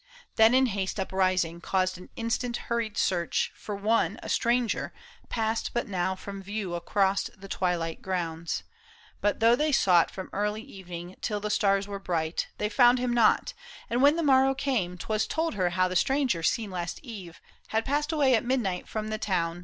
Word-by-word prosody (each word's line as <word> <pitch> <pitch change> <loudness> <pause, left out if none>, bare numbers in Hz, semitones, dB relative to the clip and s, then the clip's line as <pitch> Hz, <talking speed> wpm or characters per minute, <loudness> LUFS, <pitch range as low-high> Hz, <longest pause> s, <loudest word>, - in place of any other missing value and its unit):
Then 220 +3 +6
in 260 0 +5
haste 195 -3 -2
Uprising, 185 -3 0
caused 185 +1 0
an 180 - -12
instant 240 0 -1
hurried 230 -2 -3
search 175 -3 0
For 210 - -6
one, 205 -1 +1
a - - -6
stranger, 240 -1 +1 0.4
passed 225 0 -1
but 240 - 0
now 190 -1 -1
from 195 +1 -8
view 200 -2 -4
Across 195 +3 +1
the 195 +1 -11
twilight 175 -4 -1
grounds. 170 -3 -3 0.6
But 205 +2 0
though 230 +1 +6
they 300 +4 +1
sought 180 -10 +4
52 - - -16
PAUL 190 - -4
ISHAM. - - -14
From - - -4 0.2
e^rlv 195 -4 -12
evenii^g 175 +1 -8
till 210 -1 -1
the 210 +1 -3
stars 195 -1 +2
were 200 -1 -5
bright. 165 -3 -2
They 210 - 0
fcuzd 245 +2 +5
hir 250 0 -1
i - - 0
n^i, 240 - +3 0.4
and 240 +2 +1
when 285 +2 +6
the 335 - -1
morrow 270 -1 +4
came 230 -11 -1
"Twas 215 +4 -1
ic^i 325 +1 -1
her 185 -4 +1
how 185 +1 +2
the 185 - -4
stranger 265 -4 +2
seen 210 +4 0
last 175 -1 -4
eve 195 - -9 0.3
Had 220 +1 -1
passed 295 +3 0
away 285 -5 +3
at 225 - +3
midnight 235 -8 -1
from 215 0 -4
the 215 0 -3
town. 170 -4 -1
205 Hz, 195 wpm, -28 LUFS, 185-240 Hz, 0.6 s, Then